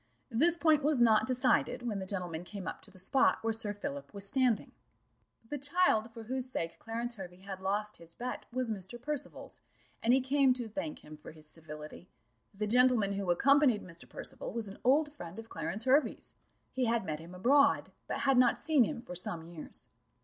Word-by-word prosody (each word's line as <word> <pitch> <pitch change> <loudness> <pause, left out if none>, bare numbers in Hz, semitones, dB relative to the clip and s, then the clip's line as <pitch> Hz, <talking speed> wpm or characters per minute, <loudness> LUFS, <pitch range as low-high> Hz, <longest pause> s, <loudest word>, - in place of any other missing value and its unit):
This 325 +9 +4
point 315 -3 +4
was 290 -2 +2
not 225 0 +5
decided 255 -1 +2
when 220 -5 -2
the 190 - -5
gentlemen 180 -4 -3
came 185 +1 -7
up - - -5
to - - -9
the 190 - -17
spot 225 +9 +3
where 225 0 +1
Sir 220 -2 -1
Philip 140 -9 -6
was 200 0 -3
standing. 255 -1 +1 0.8
The 290 +4 -4
child 285 -6 +2
for 230 -1 -9
whose 255 +2 -3
sake 165 -9 -4
Clarence 235 +2 -4
Hervey 180 -1 -9
had 190 -1 -7
lost 205 +2 -1
his 165 0 -13
bet 250 +1 -5
was 250 -1 -1
Mr. 200 +3 -6
Percival's, 290 +2 -5 0.4
and 235 - +3
he 260 - +6
came 265 0 +3
to 245 -2 -5
thank 290 +8 -5
him 155 0 -10
for 150 - -11
his 155 -1 -9
civility. 155 +2 -9 0.4
The 210 +2 -3
gentleman 235 -3 +4
who 195 -2 -3
accompanied 270 - +4
Mr. 170 -2 -12
Percival - - -6
was 230 -2 -3
an 195 - -10
old 290 +4 +3
friend 175 - -9
of 225 0 -8
Clarence 215 +3 -4
Hervey's; 275 +4 +2 0.4
he 260 -1 0
had 230 -3 +1
met 155 -2 -3
him 170 +3 -10
abroad, 280 +8 +4 0.2
but - - -2
had 270 -2 +4
not 255 - +5
seen 300 -4 +4
him 255 -2 -4
for 240 - -9
some 170 -2 -1
years. 170 -2 -8
225 Hz, 200 wpm, -32 LUFS, 185-260 Hz, 0.8 s, he